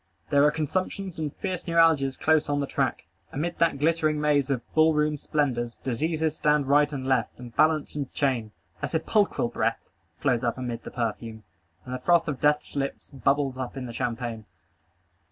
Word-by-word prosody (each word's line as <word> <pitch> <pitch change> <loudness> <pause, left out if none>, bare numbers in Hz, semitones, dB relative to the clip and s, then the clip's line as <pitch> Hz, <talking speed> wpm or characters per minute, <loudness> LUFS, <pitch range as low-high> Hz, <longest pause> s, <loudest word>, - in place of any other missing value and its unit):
There 140 0 +5
are - - +6
consumptions 180 +4 -3
and 150 -2 -2
fierce 185 -4 -4
neuralgias 165 -5 +3
close 160 -2 +2
on 145 0 +1
the 140 - 0
track. - - -1 0.3
Amid 170 +5 -3
that 165 -4 +3
glittering 155 0 +1
maze 145 -2 +2
of 130 -4 -1
ball 160 0 +4
room 150 0 +2
splendors, 130 -6 -1
diseases 155 +5 -1
stand 150 -1 +2
right 145 +1 +4
and 135 -3 -4
left, 130 -5 0
and 120 -2 -11
balance 155 -1 +2
and 140 -3 -4
chain. 125 -6 0 0.3
A - - -1
sepulchral 185 - +1
breath - - -2 0.3
floats 125 -3 +1
up 120 0 0
amid 120 -2 -4
the - - -5
perfume, 115 -1 -4 0.4
and 125 - -6
the 125 - -3
froth 170 +5 +3
of 145 -4 -3
death's 150 0 +1
lip 140 -1 -1 0.2
bubbles 135 +1 0
up 130 +1 -5
in 130 - -4
the 120 - -7
champagne. 115 -2 -3
145 Hz, 180 wpm, -26 LUFS, 125-155 Hz, 0.4 s, are